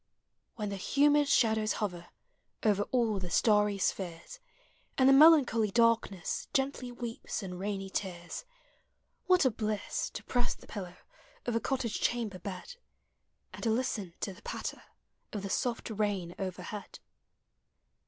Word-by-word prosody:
When 210 -2 -3
the 200 - -4
humid 290 +7 +3
shadows 220 -4 +3
hover 180 -5 -3 0.6
Over 205 -2 +3
all 230 -5 +2
the 180 -1 -5
starry 210 +1 +3
spheres, 190 - -3 0.6
And 260 - +5
the 270 - +8
melancholy 270 -7 +7
darkness 230 -5 +1
Gently 270 -2 0
weeps 235 -3 -5
in 180 -2 -6
rainy 195 0 -3
tears, 175 -4 -4 0.8
What 365 -5 +5
a 260 - +4
bliss 215 -1 -2
to - - -5
press 245 -1 0
the - - -16
pillow 185 -4 -7 0.5
Of 240 - -1
a - - +3
cottage 245 -3 -2
chamber 225 -6 0
bed, 200 - -7 0.8
And - - -9
to 230 - +1
listen 220 -6 -1
to 195 - -2
the 195 - -16
patter - - -5 0.5
Of 205 -2 -4
the 195 - -4
soft 240 -2 -1
rain 200 -5 -1
overhead! 190 +2 -5
215 Hz, 140 wpm, -31 LUFS, 195-245 Hz, 0.8 s, the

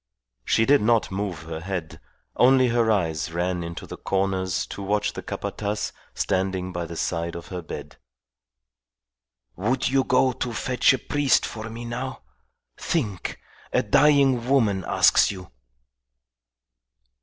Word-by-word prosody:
She 110 - +2
did 140 +2 +5
not 115 -1 +2
move 95 -5 -3
her 80 0 -6
head; 90 -2 -5 0.3
only 130 0 +5
her 115 -1 +2
eyes 80 -6 0
ran 90 +1 -1
into 85 0 -6
the - - -8
corners 95 -1 -1
to - - -8
watch 105 +2 0
the - - -6
Capataz 105 0 -3 0.2
standing 95 -1 -1
by 85 -1 -3
the 85 - -8
side 85 0 -2
of 85 - -8
her 90 -2 -5
bed. 80 - -8 1.6
"Would 115 +8 0
you 135 0 +3
go 130 +1 +3
to 120 -1 -4
fetch 125 +3 +3
a - - 0
priest 145 +2 +2
for 110 0 -6
me 115 +2 -7
now? 125 - -5 0.5
Think! 105 - -2 0.3
A - - +2
dying 135 -5 +4
woman 110 -9 +2
asks - - +5
you!" 90 -3 -8
105 Hz, 140 wpm, -24 LUFS, 90-125 Hz, 1.6 s, did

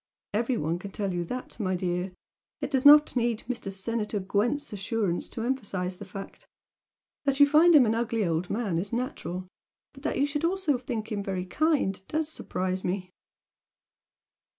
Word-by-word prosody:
Every 235 +3 +1
one 165 +1 -1
can 200 - -7
tell 195 -1 -2
you 175 0 -1
that, 250 +7 -6
my 185 -3 0
dear! 180 +1 -2 0.5
It - - -4
does 270 0 +5
not 295 -1 +8
need 235 -2 0
Mr. 235 -5 -3
Senator 210 +2 -2
Gwent's 220 +9 0
assurance 200 -3 -1
to 225 - -5
emphasise 200 -8 -2
the 205 - -8
fact! 195 +1 -9 0.8
That 275 0 +1
you 285 - +10
find 315 +3 +6
him 275 -4 +8
an 220 - +2
ugly 230 -2 0
old 170 +1 -1
man 205 -6 0
is 200 +3 -4
natural 185 - -3 0.5
but 275 - -14
that 300 - -1
you 280 - +3
should 290 +1 -3
also 335 -6 +1
think 230 -3 -4
him 205 -1 -1
'very 190 -2 -3
kind' 280 - +1
DOES 315 0 -1
surprise 185 -10 -3
me!" 185 0 -2
215 Hz, 175 wpm, -28 LUFS, 185-265 Hz, 0.8 s, you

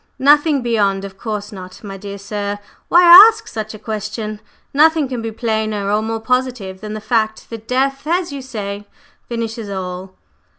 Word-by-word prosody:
"Nothing 290 0 +4
beyond? 200 -4 0
Of 195 -1 -10
course 210 0 -5
not! 185 -1 -11
My 195 -2 -7
dear 200 +1 -8
sir, 205 0 -4 0.3
why 350 +1 +5 0.3
ask 445 0 -8
such 215 -1 -6
a - - -8
question? 215 0 -5 0.3
Nothing 310 0 +4
can 250 -2 -4
be 225 0 -4
plainer 220 -3 -2
or 210 +1 +2
more 225 +1 -3
positive 245 -6 -2
than 215 0 -6
the - - -4
fact 220 0 -1
that 225 -1 -8
death, 270 +3 -1
as 345 0 0
you 280 - -5
say, 205 -5 -6 0.4
finishes 230 -2 -4
all." 185 -1 -6
220 Hz, 170 wpm, -18 LUFS, 200-250 Hz, 0.4 s, why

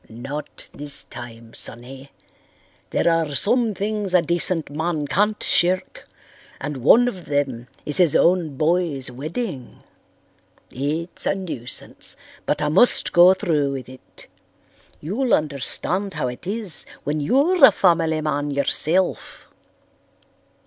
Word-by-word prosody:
"Not 135 +6 -7
this 145 0 +2
time, 115 -2 -11
sonny. 130 +4 -1 0.8
There - - 0
are 165 -3 +1
some 230 - +2
things 205 -1 -2
a 175 - +5
decent 170 -2 0
man 160 0 -2
can't 210 +7 0
shirk 180 +2 0 0.5
and 145 0 -5
one 225 - +5
of 185 -8 -5
them 135 -5 -2 0.2
is 150 - +1
his 175 -5 +3
own 170 -6 +2
boy's 155 -5 0
wedding. 150 - -6 0.9
It's 155 +6 -3
a - - +1
nuisance, 160 -11 -6 0.3
but 150 0 0
I 150 - +1
must 195 +11 +4
go 180 +2 +7
through 150 -6 0
with 130 -2 -7
it. 130 0 -14 0.8
You'll 230 - +1
understand 160 +6 -3
how 125 - -1
it 125 +8 -10
is 205 -5 -4 0.2
when 150 +1 -2
you're 285 - +2
a 265 - +11
family 165 -5 +2
man 145 -1 -2
yourself. 155 +6 -1
160 Hz, 125 wpm, -22 LUFS, 140-185 Hz, 0.9 s, a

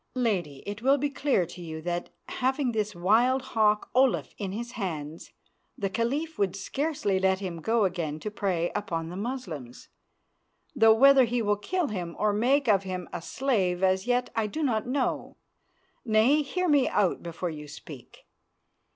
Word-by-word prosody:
Lady, 185 - -1
it 205 +1 -6
will 270 +3 +4
be 290 +1 -1
clear 275 -9 +1
to 175 +2 -11
you 160 -2 -6
that, 175 +2 -3 0.2
having 260 0 0
this 215 -3 -2
wild 235 +9 +3
hawk 210 -1 +3
Olaf 260 0 +2
in 195 -3 -3
his 235 +4 -5
hands, 160 -8 -5 0.5
the 195 -2 -2
Caliph 280 +10 -2
would 195 -2 +1
scarcely 235 -2 -1
let 190 0 +2
him 180 -4 -5
go 225 +3 +2
again 165 -5 -2
to 210 - -5
prey 180 -5 -1
upon 170 -6 -3
the 175 - -7
Moslems, 190 - -6 0.9
though 225 -3 +6
whether 270 +2 +7
he 240 +1 -1
will 205 0 +2
kill 335 - -2
him 175 -5 -4
or 210 -1 +1
make 260 +7 +2
of 200 -4 +4
him 185 -2 -5
a - - -4
slave 190 -6 0
as 190 +3 +2
yet 245 0 +1
I 220 -1 +1
do 310 +9 -3
not 230 -5 0
know. 260 0 -2 0.7
Nay, 235 +6 +4
hear 360 +6 -2
me 290 -5 +4
out 195 -4 +1
before 170 +1 -4
you 150 -1 -8
speak. 145 -3 -12
210 Hz, 170 wpm, -27 LUFS, 180-255 Hz, 0.9 s, whether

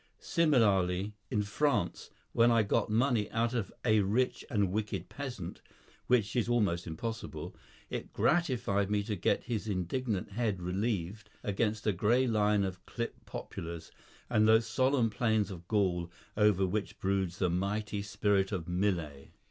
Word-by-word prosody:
Similarly, 105 - +2 0.2
in 105 - +1
France, 105 -3 0 0.2
when 115 +1 +5
I 115 - +4
had - - -11
got - - +2
money 115 -1 +2
out 115 +1 0
of 115 -6 -2
a 110 -2 +5
rich 105 +6 +1
and 105 -7 +1
wicked 100 -3 -3
peasant 125 -11 -6 0.5
(which 110 -5 +2
is 120 -1 +1
almost 100 -8 +1
impossible), 110 +8 -5 0.4
it - - -4
gratified 120 - +1
me 105 -1 +1
to 105 0 -2
get 90 - +1
his 110 -3 -3
indignant 100 +2 -2
head 105 -3 -1
relieved 100 +2 -2
against 105 +1 -1
a 105 - +3
grey 115 +8 +3
line 105 -3 +2
of 95 -1 -4
clipped 115 -1 -5
poplars, 85 -1 -7 0.4
and 110 -3 +3
those 110 +1 +5
solemn 125 0 +2
plains 110 -2 +1
of 85 -2 -9
Gaul 90 -5 +1 0.3
over 105 -3 +4
which 100 +3 -3
broods 95 -2 0
the 90 -3 +1
mighty 100 +3 -1
spirit 100 0 +1
of 90 -5 -3
Millet. 90 -6 -1
105 Hz, 150 wpm, -31 LUFS, 95-115 Hz, 0.5 s, when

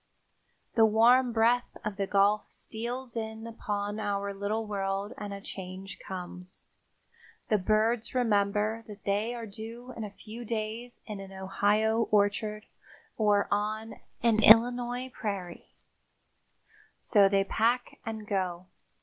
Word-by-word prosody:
The 225 - +5
warm 235 +4 +5
breath 235 +2 +2
of 210 -2 -3
the 195 -1 -1
Gulf 205 +2 +3
steals 240 +3 -6
in 220 0 -4
upon 205 -2 -3
our 200 -1 -1
little 205 +3 -2
world 195 0 -2
and 205 -1 -6
a 200 - -5
change 190 0 -8
comes. 180 0 -8 0.8
The 215 - +3
birds 220 +5 +1
remember 215 -1 +1
that 205 -2 -11
they 210 +4 0
are 235 -1 -5
due 225 +4 -8
in 225 - -5
a 210 - -4
few 215 +4 -10
days 230 +2 -4
in 210 -2 -6
an 195 0 -9
Ohio 205 +4 +1
orchard 210 +1 +1 0.5
or 205 -2 +3
on 215 +2 -1 0.3
an 225 -2 +4
Illinois 245 +3 +5
prairie, 195 -5 -5 1.2
so 200 -3 +4
they 195 0 +3
pack 235 +5 0
and 220 -2 -5
go. 185 -3 -2
215 Hz, 130 wpm, -29 LUFS, 200-225 Hz, 1.2 s, The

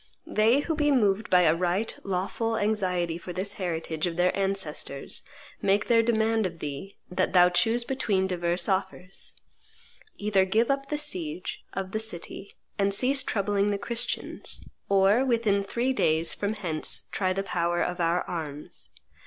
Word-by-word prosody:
They 225 +6 +3
who 320 - -2
be 295 -1 +1
moved 215 -6 +2
by 180 -1 +6
a 160 -2 +5
right 180 +5 -1
lawful 200 +4 -1
anxiety 180 -5 0
for 180 +1 -7
this 185 +3 -2
heritage 165 -2 -2
of 170 -1 -4
their 180 +1 +2
ancestors 190 -8 -2 0.4
make 200 +1 +2
their 230 -1 +4
demand 225 -2 +2
of 170 -2 -9
thee 150 +6 -6
that 185 0 0
thou 180 -1 +7
choose 225 +7 +2
between 215 -7 0
divers 175 -1 -1
offers: 190 -1 -3 0.8
either 205 -2 +2
give 220 +7 +2
up 275 0 -2
the 295 - -1
siege 180 - -3
of 190 0 -4
the 220 - -1
city, 200 -2 -4 0.3
and 200 0 +3
cease 265 +5 +3
troubling 205 -3 0
the 205 - 0
Christians, 235 +3 -3 0.2
or, 200 +5 +4
within 230 -6 +2
three 235 +6 -1
days 160 -7 +2
from 205 +1 -2
hence, 170 -7 0
try 185 -2 0
the 195 +1 -1
power 175 -2 0
of 180 +1 -3
our 170 +1 +1
arms. 150 - -5
195 Hz, 160 wpm, -27 LUFS, 175-220 Hz, 0.8 s, thou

